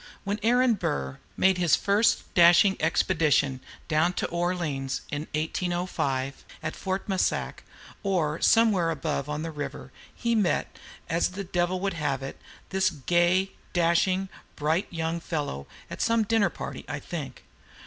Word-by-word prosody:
When 205 +1 -2
Aaron 245 +2 +4
Burr 70 - -2
[Note 70 - -15
5] - - -29 0.2
made 190 -1 +4
his 175 -3 +4
first 205 +3 +1
dashing 175 +2 +6
expedition 155 -4 +2 0.3
down 160 +3 +2
to - - -2
New - - -5
Orleans 160 -7 -1
in 145 +2 -3
1805, 155 -5 -2 0.2
at 155 - -3
Fort 190 0 -3
Massac, 190 -2 -1 0.4
or 170 -6 0
somewhere 210 -7 +4
above 150 -2 -2
on 150 +1 -3
the 165 - -4
river, 145 -3 -6 0.2
he 235 -1 0
met, 210 -6 +1 0.3
as 165 +1 +1
the 195 +2 -5
Devil 175 0 0
would 195 -1 0
have 145 -5 -2
it, 135 - -7 0.3
this 190 0 +2
gay, 175 +4 +2 0.2
dashing, 180 +2 +2 0.3
bright 160 +5 0
young 165 0 -2
fellow; 145 - -4 0.2
at - - -6
some 230 -1 +3
dinner 215 -1 +2
party, - - -7
I 145 - -3
think. 145 -5 -7
170 Hz, 150 wpm, -27 LUFS, 150-190 Hz, 0.4 s, dashing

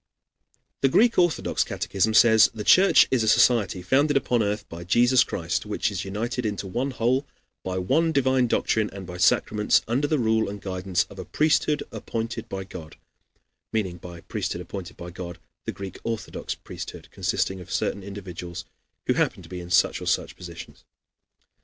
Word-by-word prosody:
"] - - -45
The 135 - +4
Greek 230 - +4
Orthodox 175 -6 +2
catechism 110 +3 -1
says: 110 -2 +7
"The 105 - -4
Church 190 - +6
is 130 -3 +3
a 110 - 0
society 105 -5 +3
founded 140 +8 +3
upon 125 -3 +1
earth 105 0 -2
by 85 +1 -8
Jesus 120 +7 +4
Christ, 85 +3 -2
which 105 0 -1
is 95 -2 -3
united 115 +6 -3
into 105 -2 -3
one 120 +9 -2
whole, 130 +3 0 0.4
by 95 0 -3
one 155 - +2
divine 130 -3 +2
doctrine 110 -1 +1
and 95 -1 -8
by 90 0 -8
sacraments, 105 +4 +3
under 130 +6 +1
the 155 - +1
rule 110 -4 +1
and 100 0 -6
guidance 95 -1 -1
of 100 - -13
a - - -4
priesthood 150 - +1
appointed 115 +1 -4
by 95 0 -4
God," 85 -4 -10 0.8
meaning 95 -5 -1
by 85 0 -10
the 85 - -13
"priesthood 90 - -3
appointed 90 0 -8
by 85 0 -8
God" 85 -1 -7 0.3
the - - -2
Greek 95 -1 -8
Orthodox 115 -4 -4
priesthood, - - -9
consisting 95 0 -1
of 90 - -11
certain 100 - -1
individuals 95 -3 -7 0.4
who - - +2
happen - - 0
to - - -14
be 90 - -6
in 85 0 -9
such 90 - +3
or - - -6
such - - 0
positions. - - -10
105 Hz, 180 wpm, -25 LUFS, 95-125 Hz, 0.8 s, says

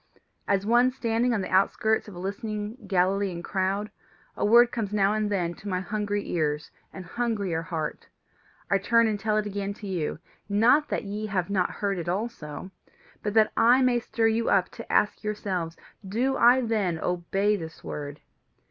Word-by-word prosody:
As 200 -1 +1
one 240 +3 +4
standing 240 -1 0
on 220 -4 0
the 185 - -5
outskirts 220 +4 +2
of 205 - -10
a - - -8
listening 210 +3 -5
Galilean 190 -1 +1
crowd, 195 +3 -1 0.4
a - - -3
word 235 +3 +6
comes 220 -4 -3
now 205 -1 +2
and 215 -1 0
then 175 -4 -1
to 205 - -12
my 185 -2 0
hungry 205 +1 -2
ears 150 -3 -1 0.2
and 185 - -9
hungrier 200 -5 -1
heart: 165 -3 -4 0.6
I 200 - +4
turn 230 +4 +4
and 215 -2 0
tell 215 +1 0
it 215 - 0
again 200 0 -3
to 210 - -10
you 180 -6 -2 0.3
not 235 +9 +4
that - - -1
ye 210 +1 -4
have 195 -2 -2
not 190 -3 +1
heard 200 -3 -2
it 170 0 -4
also, 185 -4 -4 0.5
but 210 0 -3
that 220 -1 +5
I 250 +3 +5
may 250 -1 +3
stir 230 -1 -1
you 225 +1 0
up 190 -2 +3
to - - -9
ask 205 - +2
yourselves: 190 -6 -3 0.3
'Do 235 +8 0
I 245 +2 +6
then 210 -8 0
obey 185 +5 0
this 160 -5 -8
word? 145 0 -6
205 Hz, 180 wpm, -26 LUFS, 185-220 Hz, 0.6 s, word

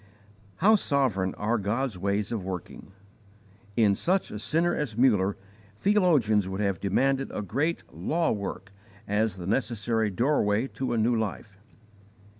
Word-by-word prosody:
How 215 +5 +5
sovereign 125 - 0
are 110 +3 0
God's 110 +4 -1
ways 100 +3 -1
of 110 -5 -2
working! 95 +1 -7 0.9
In 105 -3 +5
such 185 - 0
a 105 - -5
sinner 165 +9 +1
as 125 -8 -3
Muller, 105 -6 +3 0.4
theologians 135 - +3
would 95 +1 -4
have 100 -4 0
demanded 135 +7 +1
a 105 - -4
great 145 +11 -1
'law 165 0 0
work' 100 -2 -5 0.4
as 105 -1 0
the 90 - -7
necessary 110 0 0
doorway 110 0 +1
to 130 - -3
a - - 0
new 115 +2 +2
life. 105 -2 -4
110 Hz, 140 wpm, -27 LUFS, 100-135 Hz, 0.9 s, How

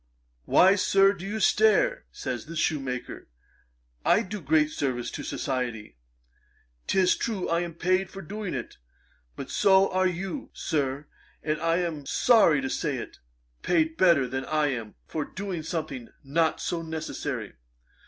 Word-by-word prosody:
"Why, 190 +2 +6
Sir, 195 0 +4
do 195 -1 -8
you 215 +2 -3
stare? - - +3
(says - - -5
the 165 - -7
shoemaker,) 135 -5 -2 0.8
I 215 - +4
do 205 0 -6
great 155 +1 +2
service 130 -5 -2
to - - -5
society. 120 - -3 0.9
'Tis 185 -2 +3
true 210 -5 -2
I 170 0 +1
am 170 -2 -4
paid 185 +2 +1
for 195 - -9
doing 205 -5 -5
it; 120 - -6 0.6
but - - -7
so 195 0 +4
are 185 0 +2
you, 185 - -4
Sir: 140 -1 -2 0.4
and 155 0 -1
I 165 0 +2
am 155 -5 -4
sorry 210 - +4
to 135 - -2
say 145 -5 -1
it, - - -8 0.4
paid 160 -2 +1
better 170 -8 +4
than 130 +2 -3
I 155 0 +1
am, 115 -5 -5
for 155 - -3
doing 185 0 -5
something 155 -7 -5
not 160 +4 +1
so 170 -1 -2
necessary. 160 -1 -5
165 Hz, 150 wpm, -27 LUFS, 140-190 Hz, 0.9 s, Why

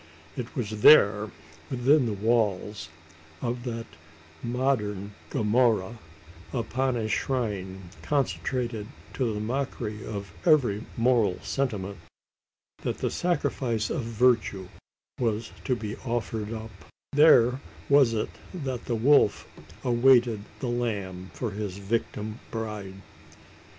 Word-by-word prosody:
It 125 +4 -6
was 110 -5 -3
there 105 -7 +7 0.4
within 130 +1 +3
the 110 - -1
walls 105 -4 0 0.5
of 120 0 -3
that 115 -2 -4 0.6
modern 110 -6 -1 0.2
Gomorrah 110 -1 +2 0.5
upon 130 +1 -1
a 110 -2 -1
shrine 95 -8 -2
consecrated 125 -6 -1 0.3
to 125 -4 0
the 105 - -3
mockery 110 -2 -3
of 100 -4 -6
every 120 -8 +3
moral 115 -6 +3
sentiment, 100 -8 -2 0.8
that - - -2
the - - -1
sacrifice 125 -10 0
of - - -1
virtue 115 -5 +1 0.5
was 110 -2 -1
to 125 - +2
be 110 -2 -5
offered 115 -3 -3
up 110 -1 -6 0.4
there 135 -4 +6 0.3
was 140 -5 +5
it 105 - -1 0.2
that 130 -7 -4
the 120 - -1
wolf 120 -2 +4 0.4
awaited 120 -3 +4 0.2
the 130 - -2
lamb 100 -6 -3
for 120 -4 -3
his 100 -2 -4
victim 105 +1 -3
bride! 105 -4 -5
115 Hz, 110 wpm, -27 LUFS, 105-125 Hz, 0.8 s, there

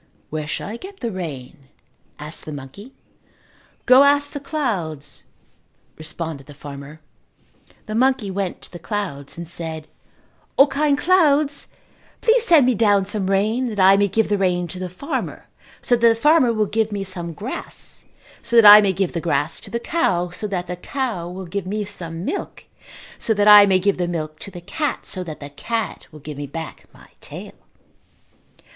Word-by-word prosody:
"Where 155 -1 -3
shall - - -4
I 220 +3 -5
get 385 +7 -11
the 235 -2 -2
rain?" 145 -6 -7 0.5
asked 150 +1 -4
the 155 - -6
monkey. 145 - -10 0.9
"Go 255 +1 +7
ask 285 0 +3
the 285 - -5
clouds," 190 - -4 0.7
responded 155 -3 -6
the 145 - -12
farmer. 145 +1 -10 0.8
The 215 - -6
monkey 245 -3 +1
went 190 -1 -3
to - - -12
the 175 - -9
clouds 170 -9 -5
and 170 0 -6
said, 160 -2 -6 0.7
"O, 275 - +8
kind 285 +1 +1
clouds, 300 -5 +3 0.5
please 460 0 +3
send 320 -7 +6
me 255 - +3
down 205 -3 +3
some 200 -1 -2
rain 215 +6 +1
that 210 -2 -5
I 190 +1 +7
may 200 0 +3
give 220 +3 +1
the 205 -1 +1
rain 180 -2 +1
to 180 - -7
the 185 -1 -4
farmer 180 +11 -5 0.4
so 245 - +3
that 235 0 +4
the 225 - +3
farmer 290 0 +4
will 215 -2 +1
give 220 +1 -1
me 200 -1 -3
some 180 -3 -4
grass 215 - -6 0.4
so 235 - -3
that 225 - +6
I 210 +1 +11
may 195 -2 +1
give 190 -1 -1
the 170 - -2
grass 160 -2 0
to - - -10
the 235 - -2
cow 185 - 0
so 210 +4 -4
that 185 -3 -3
the 180 - -5
cow 215 -6 -3
will 185 +1 -7
give 185 +2 -4
me 210 +2 -2
some 170 -3 -5
milk 400 - -5 0.5
so 220 - 0
that 205 0 +2
I 205 -1 +10
may 190 -1 +4
give 195 +1 0
the 175 - 0
milk 155 -3 -4
to - - -7
the 175 -2 -10
cat 295 - -3
so 185 - -5
that 155 -3 -8
the 145 0 -9
cat 225 +9 -4
will 155 -1 -13
give 150 0 -8
me 145 - -5
back 160 +3 -7
my - - -18
tail." - - -9
195 Hz, 190 wpm, -21 LUFS, 170-235 Hz, 0.9 s, I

